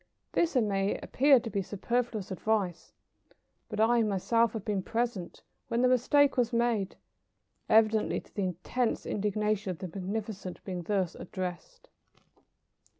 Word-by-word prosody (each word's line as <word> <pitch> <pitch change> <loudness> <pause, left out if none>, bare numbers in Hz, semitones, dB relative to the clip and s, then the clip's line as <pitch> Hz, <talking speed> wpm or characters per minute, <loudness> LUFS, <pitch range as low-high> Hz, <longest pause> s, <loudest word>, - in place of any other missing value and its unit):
This 335 -3 +1
may 200 -4 +1
appear 275 0 +4
to 230 - -6
be 200 - 0
superfluous 220 +1 -2
advice, 185 - -1 0.8
but 210 - -5
I 235 +2 +4
have 225 - +2
myself 230 +4 +2
been 205 -3 0
present 230 -4 -3 0.2
when 235 +1 0
the - - +6
mistake 265 +3 +4
was 245 -2 +2
made, 235 -5 0 0.7
evidently 220 0 +4
to - - -19
the 200 - -1
intense 185 +7 -1
indignation 210 0 -1
of 180 - -3
the 185 - -5
magnificent 195 +1 -5
being 185 -2 -4
thus 185 -1 0
addressed. 185 - -6
215 Hz, 135 wpm, -30 LUFS, 190-235 Hz, 0.8 s, the